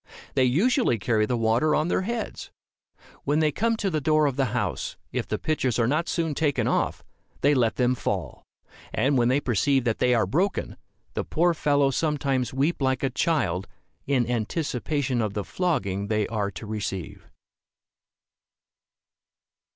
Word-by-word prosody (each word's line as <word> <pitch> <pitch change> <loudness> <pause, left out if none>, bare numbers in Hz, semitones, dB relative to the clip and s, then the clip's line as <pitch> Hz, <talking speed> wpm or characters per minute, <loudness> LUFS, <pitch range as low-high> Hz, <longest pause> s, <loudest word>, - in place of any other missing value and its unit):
They 130 - +3
usually 190 - +2
carry 110 0 +1
the 125 - 0
water 115 +7 +2
on 155 - +1
their 180 - +1
heads. 225 +2 -4 0.7
When 145 +2 +1
they 155 -1 +3
come 225 +8 0
to 200 -3 -1
the 155 -2 0
door 155 +1 +3
of 140 -3 0
the 135 -1 +1
house, 115 - -2
if - - -2
the - - -1
pitchers 135 -6 0
are 115 - +3
not 155 +7 0
soon 165 -3 0
taken 145 -1 0
off, - - 0 0.4
they 145 +1 +4
let 115 -6 +2
them 125 0 +2
fall; 125 - -3 0.5
and 140 +2 +1
when 120 -2 +3
they 130 +3 +3
perceive 135 +1 +1
that 115 -3 -1
they 125 -1 +3
are 115 - +2
broken, 185 +6 -1 0.4
the - - -2
poor 175 +2 +2
fellows 145 -4 +2
sometimes 140 -6 0
weep 140 +5 0
like 130 0 +1
a 135 - +1
child, 100 - 0 0.4
in 130 -4 +2
anticipation 125 +2 -1
of 105 -2 -2
the 105 - -1
flogging 105 - -1
they 105 -1 +1
are 105 -3 -1
to 100 +3 -8
receive. 100 -5 -5
135 Hz, 165 wpm, -25 LUFS, 115-155 Hz, 0.7 s, they